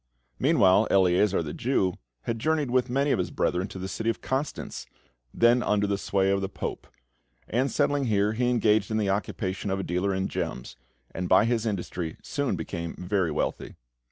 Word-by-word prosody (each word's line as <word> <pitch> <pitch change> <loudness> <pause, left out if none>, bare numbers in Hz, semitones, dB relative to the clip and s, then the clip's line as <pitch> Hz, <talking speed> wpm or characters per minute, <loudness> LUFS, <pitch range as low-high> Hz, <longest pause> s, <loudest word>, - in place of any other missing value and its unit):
Meanwhile, 110 - +4
Eleazar, 95 0 +3
the 75 - -5
Jew, 105 -8 +1 0.3
had 115 -1 -2
journeyed 155 -1 0
with 125 0 +2
many 140 +3 +1
of - - +2
his 90 - -1
brethren 90 +2 0
to - - -9
the 95 0 -4
city 110 +3 -2
of 115 - -1
Constance, 135 +3 -4 0.4
then 120 +1 +4
under 105 -2 +1
the 100 0 0
sway 95 -1 +1
of 100 0 +1
the 95 - -2
Pope; - - -5 0.6
and, 130 +4 +1
settling 145 -1 +1
here, 105 -2 +2
he 120 +2 +1
engaged 110 -4 +2
in 110 - 0
the 100 -3 +1
occupation 95 0 -2
of 95 0 -1
a - - -2
dealer 90 +3 0
in 95 0 -1
gems, - - -4 0.4
and 90 -1 -3
by 105 - +6
his 115 -1 0
industry 90 -5 -3
soon 140 -8 -1
became 85 0 -5
very 90 -1 0
wealthy. 75 - -3
100 Hz, 185 wpm, -27 LUFS, 95-120 Hz, 0.6 s, by